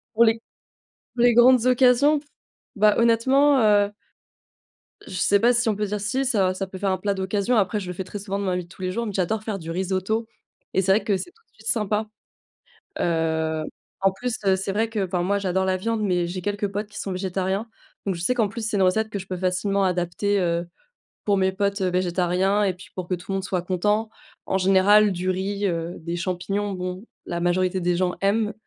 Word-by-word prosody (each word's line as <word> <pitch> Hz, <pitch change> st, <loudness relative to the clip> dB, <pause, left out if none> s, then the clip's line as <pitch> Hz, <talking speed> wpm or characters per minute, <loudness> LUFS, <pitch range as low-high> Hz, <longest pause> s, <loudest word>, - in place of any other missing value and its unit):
Pour 235 Hz, -, +6 dB
les 225 Hz, -1 st, +4 dB, 0.8 s
pour 240 Hz, -, 0 dB
les 245 Hz, -1 st, +5 dB
grandes 245 Hz, +1 st, +6 dB
occasions? 255 Hz, +4 st, +4 dB, 0.6 s
Bah, 210 Hz, 0 st, +5 dB
honnêtement, 265 Hz, +5 st, +4 dB
heu 205 Hz, -2 st, +4 dB, 1.1 s
je -, -, -9 dB
sais 200 Hz, +2 st, +3 dB
pas 240 Hz, +3 st, +5 dB
si 240 Hz, 0 st, +1 dB
on 215 Hz, -, +2 dB
peut 210 Hz, +1 st, -1 dB
dire 205 Hz, +1 st, -3 dB
si, 230 Hz, +7 st, -1 dB
ça 200 Hz, -8 st, +1 dB
ça 195 Hz, +1 st, -3 dB
peut 190 Hz, 0 st, -9 dB
faire 195 Hz, 0 st, 0 dB
un 185 Hz, -, 0 dB
plat 200 Hz, -1 st, -1 dB
d'occasion. 200 Hz, +5 st, 0 dB
Après, 210 Hz, 0 st, +1 dB
je 185 Hz, -, -7 dB
le -, -, -3 dB
fais 190 Hz, -, -5 dB
très 195 Hz, +3 st, -7 dB
souvent 200 Hz, 0 st, -4 dB
dans 200 Hz, -, -3 dB
ma 180 Hz, -1 st, 0 dB
vie 180 Hz, -, -3 dB
de -, -, -20 dB
tous 185 Hz, -, -13 dB
les 185 Hz, 0 st, -1 dB
jours. 235 Hz, +4 st, -2 dB
Mais 210 Hz, -, -4 dB
j'adore 200 Hz, +3 st, -1 dB
faire 215 Hz, -2 st, -3 dB
du 165 Hz, -2 st, -7 dB
risotto 190 Hz, +5 st, -1 dB, 0.5 s
et -, -, +3 dB
c'est 190 Hz, +1 st, +3 dB
vrai 210 Hz, -, +2 dB
que 205 Hz, -, +1 dB
c'est 350 Hz, -, -6 dB
tout 455 Hz, +2 st, -30 dB
de -, -, -43 dB
suite 220 Hz, -, -18 dB
sympa, 215 Hz, -1 st, 0 dB, 0.9 s
heu, 160 Hz, -1 st, 0 dB, 0.4 s
en 195 Hz, -, +5 dB
plus, 240 Hz, +5 st, -3 dB
heu, 190 Hz, -1 st, +4 dB
c'est 190 Hz, +1 st, -3 dB
vrai 220 Hz, +3 st, 0 dB
qu'enfin 190 Hz, -5 st, -1 dB
moi 200 Hz, +3 st, +1 dB
j'adore 190 Hz, -1 st, 0 dB
la 185 Hz, 0 st, +1 dB
viande, 225 Hz, +4 st, -2 dB
mais 180 Hz, -4 st, +1 dB
j'ai 180 Hz, +2 st, -4 dB
quelques 205 Hz, +2 st, -1 dB
potes 205 Hz, +2 st, -4 dB
qui 210 Hz, -, -10 dB
sont 195 Hz, -, -4 dB
végétariens. 190 Hz, +3 st, -2 dB, 0.4 s
Donc 195 Hz, -, 0 dB
je 170 Hz, -, -7 dB
sais 215 Hz, -, +2 dB
qu'en 225 Hz, -4 st, +1 dB
plus, 225 Hz, +1 st, -5 dB
c'est 210 Hz, -, -1 dB
une -, -, +3 dB
recette 220 Hz, +4 st, +2 dB
que 205 Hz, -, -3 dB
je 190 Hz, -, -8 dB
peux 185 Hz, -, -4 dB
facilement 185 Hz, +2 st, 0 dB
adapter, 185 Hz, +3 st, 0 dB
heu, 170 Hz, -1 st, 0 dB, 0.6 s
pour 205 Hz, -, +3 dB
mes 190 Hz, 0 st, +2 dB
potes, 200 Hz, +1 st, -1 dB
heu, 185 Hz, -, +2 dB
végétariens 180 Hz, +2 st, +1 dB
et 195 Hz, -2 st, +1 dB
puis 180 Hz, +1 st, -14 dB
pour 185 Hz, -2 st, -5 dB
que 185 Hz, -, +1 dB
tout 175 Hz, +3 st, -9 dB
le -, -, 0 dB
monde 195 Hz, -, -2 dB
soit 185 Hz, -1 st, -1 dB
content. 210 Hz, +5 st, 0 dB, 0.4 s
En 190 Hz, -, 0 dB
général, 195 Hz, +2 st, +5 dB
du 185 Hz, 0 st, -2 dB
riz, 200 Hz, +2 st, -1 dB
heu, 170 Hz, -1 st, -3 dB
des 170 Hz, +1 st, -4 dB
champignons, 190 Hz, +3 st, -2 dB
bon, 185 Hz, +1 st, -5 dB, 0.2 s
la 170 Hz, -, -3 dB
majorité 185 Hz, +1 st, +1 dB
des 175 Hz, 0 st, +1 dB
gens 180 Hz, -1 st, 0 dB
aiment. 210 Hz, +2 st, +1 dB
195 Hz, 230 wpm, -24 LUFS, 185-215 Hz, 1.1 s, Pour